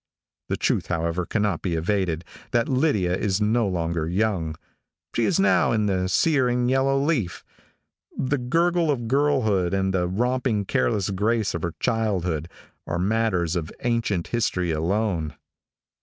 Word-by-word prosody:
The - - 0
truth, - - 0
however, 85 0 -1
cannot 105 -2 0
be 90 -3 -1
evaded, 85 -1 -1 0.2
that 120 -2 +1
Lydia 125 - +1
is 95 0 0
no 110 +1 +2
longer 85 -3 -1
young. 90 -5 0 0.6
She 115 - +2
is 185 - +1
now 195 - +3
in 110 -2 +1
the 95 -2 0
sere 135 - +3
and 125 0 +1
yellow 135 +1 +2
leaf. 135 - -1 0.7
The 140 +2 0
gurgle 165 +6 +1
of 120 -5 -1
girlhood, 115 -10 +2
and 95 0 0
the 90 -1 +1
romping 120 +1 0
careless 105 -5 0
grace 105 +2 0
of 85 - -3
her 85 -1 -3
childhood, 90 -9 -1 0.4
are 85 - -2
matters 95 -3 +1
of 80 -2 -3
ancient 115 -7 -1
history 90 -7 0
alone. 85 -1 -1
105 Hz, 145 wpm, -24 LUFS, 90-125 Hz, 0.7 s, now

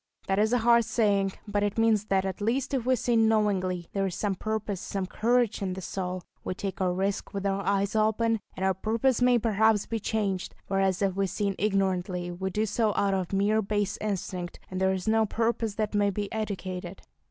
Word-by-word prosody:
That 195 +1 +1
is 215 +1 +3
a 245 - +4
hard 235 0 +5
saying, 205 -4 +1
but 205 0 0
it 205 +1 -1
means 225 -2 +3
that 195 -2 +1
at 190 +1 -4
least 245 +6 0
if 255 -3 -1
we 260 - +4
sin 230 -1 +2
knowingly, 190 -5 +1
there 195 -1 +1
is 180 - -4
some 205 -2 0
purpose, 210 -1 -3
some 195 -1 -3
courage 235 +3 +1
in 190 -2 -1
the 190 - -6
soul. 185 -1 -4 0.2
We 185 - -3
take 195 +1 -4
a 185 -1 +2
risk 195 +2 -2
with 200 0 -3
our 195 0 0
eyes 200 +1 0
open, 220 +1 +2 0.2
and 190 - -1
our 190 - +3
purpose 225 +6 0
may 245 0 +5
perhaps 220 -2 +2
be 225 - -3
changed; 200 -3 -2
whereas 195 0 +1
if 195 -1 +1
we 195 0 +1
sin 200 +2 -1
ignorantly, 185 -3 0
we 190 +2 -3
do 210 +3 0
so 215 0 0
out 200 -1 +2
of 190 -2 0
a - - 0
mere 210 +3 +3
base 205 -1 -1
instinct, 185 -4 -3
and 185 0 -3
there 190 0 +3
is 190 0 -3
no 220 0 +3
purpose 225 -1 -1
that 215 0 -2
may 205 -1 +3
be 200 +1 -3
educated. 190 -4 -4
200 Hz, 215 wpm, -28 LUFS, 190-220 Hz, 0.2 s, hard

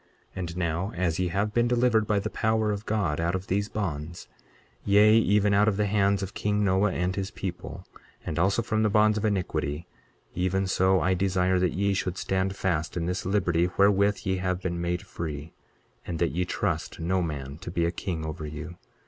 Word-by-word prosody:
23:13 - - -11
And 85 -2 -4
now 90 +3 -1
as 85 -1 0
ye 90 - +1
have 100 +4 -1
been 120 +1 +3
delivered 120 -3 +2
by 105 - +2
the 100 +2 -2
power 110 -1 +1
of 105 +1 -5
God 100 -9 0
out 85 +2 0
of 95 0 -4
these 100 +2 -1
bonds; 85 -5 -4 0.6
yea, 105 +2 +5
even 105 -2 +3
out 105 +2 +4
of 105 -3 +2
the 105 - +2
hands 100 -1 +2
of 95 - -6
king 105 0 0
Noah 95 +1 +2
and 90 +1 -1
his 95 -1 -3
people, 95 -5 -6 0.4
and 80 - -3
also 100 +6 +2
from 110 -1 0
the 110 - +3
bonds 105 +1 +3
of 110 - -2
iniquity, 85 -6 -1 0.5
even 95 +2 0
so 95 0 +3
I 95 - +2
desire 95 0 +1
that 90 -1 +1
ye 100 +2 +1
should 95 -1 -2
stand 95 0 -1
fast 90 -4 -1
in 85 - -1
this 90 +1 -2
liberty 90 -4 +2
wherewith 100 0 +3
ye 95 0 0
have 90 0 -1
been 85 -2 -3
made 85 0 -2
free, 80 -1 -6 0.5
and 85 - -4
that 85 0 +1
ye 90 +3 -1
trust 90 -2 -2
no 90 +3 0
man 70 -3 -5
to - - -7
be 85 -1 0
a 85 - +1
king 85 -3 -4
over 80 0 -5
you. 80 +3 -7
95 Hz, 210 wpm, -27 LUFS, 85-100 Hz, 0.6 s, yea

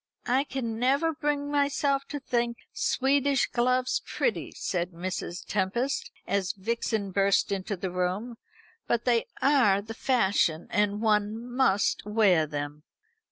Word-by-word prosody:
"I 260 +3 +2
can 235 -5 -4
never 280 +6 +2
bring 290 -1 -1
myself 280 -1 +1
to 290 - -5
think 240 -3 -1 0.2
Swedish 275 0 +2
gloves 255 +1 +1
pretty," - - -2
said 180 -1 -2
Mrs. 180 0 -5
Tempest, 215 +7 -1 0.2
as 195 -2 0
Vixen 215 0 -2
burst 195 +1 +2
into 195 0 -2
the 185 0 -4
room, 185 +7 -2 0.5
"but 235 -1 0
they 240 -2 +2 0.2
are 255 -9 +4
the 215 +2 -7
fashion, 195 -10 +1
and 205 +1 +1
one 215 +2 +1
must 205 -7 +2
wear 200 -7 +3
them." 145 0 -5
225 Hz, 130 wpm, -28 LUFS, 195-265 Hz, 0.5 s, are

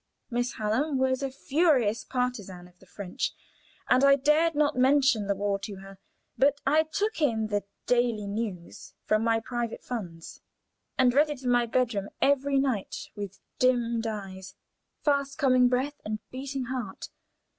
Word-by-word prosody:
Miss 245 +1 -1
Hallam 255 +7 0
was 260 0 +1
a 275 - -1
furious 265 -5 +1
partisan 210 -9 -3
of 180 0 -24
the 190 - -20
French, 185 -1 -4 0.5
and 255 +1 +4
I 275 0 +7
dared 300 +4 +3
not 295 -1 +2
mention 260 -4 +3
the 200 - +1
war 200 0 -1
to 200 0 -6
her, 195 0 -12 0.4
but 285 +1 +4
I 300 +3 +4
took 415 0 -1
in 220 -7 +1
the 205 -1 -1 0.2
"Daily 240 -4 +1
News" 200 -4 -5
from 215 +1 +2
my 225 0 +2
private 235 0 -4
funds, 175 -9 -7 0.6
and 255 -2 +4
read 295 +3 +4
it 280 -3 -6
in 250 - +1
my 240 -1 +3
bedroom 225 -5 0
every 280 0 +2
night 260 -8 -1
with 200 -2 -6 0.2
dimmed 235 -2 +2
eyes, 190 -3 -6 0.5
fast 280 -1 +1
coming 255 -4 +4
breath, 265 +4 -1
and 215 0 -3
beating 270 +1 -4
heart. 240 -6 -5
245 Hz, 155 wpm, -28 LUFS, 210-275 Hz, 0.6 s, I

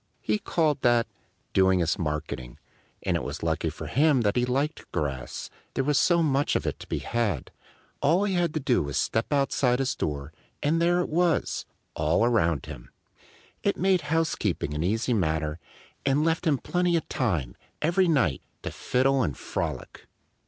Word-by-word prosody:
He 105 -1 0
called 155 -4 +1
that 120 -1 +4 0.5
"doing 95 -1 +4
his 85 -2 +1
marketing." 75 -6 -4 0.5
And - - +1
it - - 0
was - - -5
lucky - - 0
for - - -8
him 145 -2 +3
that 105 -2 +1
he 125 - +2
liked 140 +5 -2
grass, 65 -4 -3 0.2
there 135 - +1
was 145 +1 +2
so 170 -1 +4
much 140 -1 +1
of - - 0
it - - -2
to - - -10
be - - -2
had. 110 - -2 0.5
All 165 +7 +3
he 200 -2 0
had 175 -3 +1
to - - +1
do 130 -4 +2
was 70 -2 -3
to - - +3
step 110 +5 -1
outside 135 -3 +2
his 135 0 0
door; 75 0 -3 0.3
and 160 +3 +2
there 175 +1 +3
it - - -3
was, 170 +1 +1 0.3
all 80 +8 +2
around 85 - +2
him! - - -9 0.7
It 200 - +1
made 185 -1 +3
housekeeping 130 - 0
an 75 - -2
easy 110 +7 +1
matter 80 -5 0 0.4
and 140 +3 +2
left 165 +1 +1
him 145 -3 +3
plenty 175 +5 0
of 160 - -4
time, 85 - -1 0.2
every 175 +4 +2
night, 125 - +2 0.2
to - - -4
fiddle 135 +1 +1
and 75 - -1
frolic. - - -5
125 Hz, 180 wpm, -27 LUFS, -, 0.7 s, that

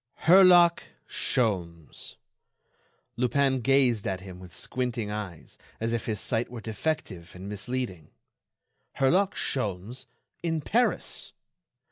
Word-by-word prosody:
Herlock 175 -1 +7 0.3
Sholmes!... 90 - -2 1.0
Lupin 130 +2 +2
gazed 125 -4 +3
at 95 -1 -2
him 95 -2 -10
with 90 -1 -12
squinting 120 -4 -3
eyes 100 -7 -7 0.2
as 115 +1 -1
if 115 - -2
his 110 -3 -1
sight 115 +1 0
were 120 -1 -7
defective 105 - -4
and 95 +2 -8
misleading. 105 -3 -4 0.9
Herlock 185 +9 +2
Sholmes 120 +2 -3 0.3
in 165 -2 -1
Paris! 235 - 0
115 Hz, 105 wpm, -27 LUFS, 100-135 Hz, 1.0 s, Herlock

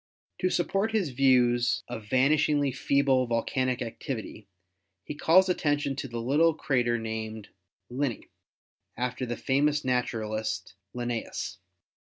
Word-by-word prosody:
To 185 - +1
support 195 +5 0
his 200 -8 +1
views 120 -2 +3
of 110 -2 -7
vanish 140 +5 +3
ingly 145 -3 +1
feeble 135 -2 +2
volcanic 125 +2 0
activity 110 -3 -6 0.6
he - - -6
calls 170 +6 +4
attention 145 -5 0
to 135 - -4
the 120 -2 -6
little 150 +7 +3
crater 120 -6 +1
named 110 -1 -5 0.4
Linne, 130 -2 -2 0.7
after 125 +1 -2
the 120 - -3
famous 145 +2 +1
naturalist, 110 -5 -2 0.2
Linnaeus. 115 -4 -4
130 Hz, 120 wpm, -28 LUFS, 120-145 Hz, 0.7 s, calls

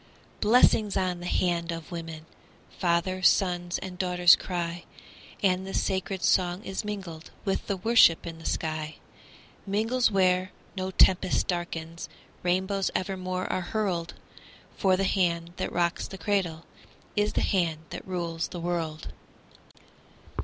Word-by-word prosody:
Blessings 215 -2 +4
on 180 -2 0
the 175 - -6
hand 175 -2 0
of 165 0 -7
women! 165 -2 -6 0.5
Fathers, 180 +1 +3
sons, 175 -2 0
and 185 -1 -8
daughters 180 -2 +6
cry, 175 -1 -4 0.6
And 190 -1 +2
the 195 - -5
sacred 190 -1 -1
song 180 +2 +2
is 195 +2 -4
mingled 190 -6 -6 0.2
With 195 - -1
the 200 - -1
worship 210 -4 +5
in 165 -1 -7
the 165 - -12
sky 155 -1 -2 0.7
Mingles 225 +5 +2
where 185 -2 +2 0.2
no 190 -1 -2
tempest 185 0 +4
darkens, 170 -2 -4 0.3
Rainbows 190 +2 0
evermore 185 -1 -2
are 185 - 0
hurled; 175 -3 -2 0.6
For 190 -1 +3
the 195 - 0
hand 175 -3 0
that - - -2
rocks 170 0 0
the 195 - -8
cradle 185 -6 -1 0.5
Is 210 0 +1
the - - +1
hand 170 -5 +1
that - - -7
rules 170 -2 -2
the 175 - -7
world. 165 -3 -3
180 Hz, 135 wpm, -27 LUFS, 170-190 Hz, 0.7 s, daughters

